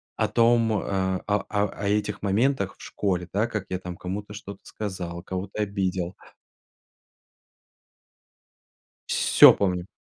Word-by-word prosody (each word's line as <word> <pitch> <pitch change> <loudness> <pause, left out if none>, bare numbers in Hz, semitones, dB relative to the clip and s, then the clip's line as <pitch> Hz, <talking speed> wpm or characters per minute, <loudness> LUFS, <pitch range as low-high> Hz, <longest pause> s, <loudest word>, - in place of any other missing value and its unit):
о - - +1
том, 115 -1 +3
а 95 -2 -1
а 105 -1 +1
а 105 0 +1
а 100 +1 -5
этих 105 0 -1
моментах 100 0 +1
в - - -17
школе, 90 -4 -2
да, 105 +3 +1
как 110 -5 -4
я 90 - -2
там 90 -1 -7
кому-то 100 +3 -5
что-то 100 -1 -9
сказал, 90 -5 -5
кого-то 95 +3 -4
обидел. 95 -3 -2 2.9
Всё - - +7
помню. 90 -2 -1
100 Hz, 125 wpm, -25 LUFS, 95-105 Hz, 2.9 s, Всё